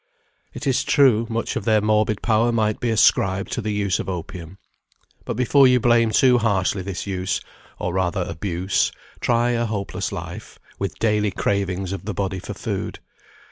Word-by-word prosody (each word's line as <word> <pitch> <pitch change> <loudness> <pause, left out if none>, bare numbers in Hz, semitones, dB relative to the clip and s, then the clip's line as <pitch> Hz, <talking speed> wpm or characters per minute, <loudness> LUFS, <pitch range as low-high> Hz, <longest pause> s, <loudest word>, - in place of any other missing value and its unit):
It 125 - -6
is 135 0 +2
true, 120 -5 +4
much 115 0 -2
of - - -2
their 110 -2 +3
morbid 105 0 +1
power 115 +1 +2
might 110 -2 0
be 120 - -1
ascribed 100 -3 +2
to - - -2
the 110 - -3
use 100 -2 0
of - - -4
opium. 90 0 -6 0.7
But - - -3
before 130 +3 +5
you 125 0 +4
blame 120 -1 +3
too 125 +3 +4
harshly 100 -3 +1
this 95 -1 -5
use, 95 -2 -2 0.4
or 90 - -3
rather 95 0 0
abuse, 90 +2 -1 0.3
try 120 0 +2
a 120 0 0
hopeless 105 -2 -3
life, - - -7 0.2
with 95 -5 -3
daily 105 -2 +1
cravings 95 -1 -1
of 95 -1 -6
the 105 -3 -4
body 95 -1 -2
for - - -7
food. - - -4
105 Hz, 175 wpm, -22 LUFS, 95-115 Hz, 0.7 s, before